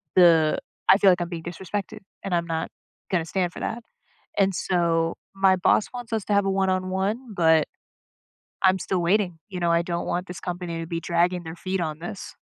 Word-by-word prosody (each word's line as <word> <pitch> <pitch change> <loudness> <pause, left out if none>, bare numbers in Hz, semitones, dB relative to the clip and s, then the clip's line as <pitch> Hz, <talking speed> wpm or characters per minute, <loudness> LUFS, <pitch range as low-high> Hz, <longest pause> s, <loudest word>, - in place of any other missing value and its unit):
the 165 -4 +5 0.3
I 190 - +9
feel 200 -2 +5
like 180 - +1
I'm 175 - -2
being 165 -2 -6
disrespected, 195 +5 -5 0.2
and 185 -3 -1
I'm 170 - 0
not 165 -1 -2 0.4
gonna 170 -3 +1
stand 180 +1 -1
for - - -8
that. 230 +1 -3 0.5
And 195 -1 +3
so 165 -2 +1 0.2
my 195 -1 +4
boss 185 +3 +3
wants 240 -2 -6
us 220 -3 -1
to 210 - 0
have 200 -1 +3
a 195 - +1
one 190 0 +1
on 185 0 0
one, 210 +6 -2
but 160 -2 +4 1.0
I'm 190 0 +5
still 180 +1 -1
waiting. 180 -1 +1
You 180 -2 -5
know? 170 -1 +2
I 170 0 +4
don't 170 0 -3
want 180 +1 -2
this 180 -1 -7
company 175 -2 -4
to 165 - -6
be 170 -1 -2
dragging 175 +1 +1
their 160 +1 -7
feet 185 +2 -3
on 155 -1 -3
this. 180 +3 -7
180 Hz, 210 wpm, -25 LUFS, 170-195 Hz, 1.0 s, I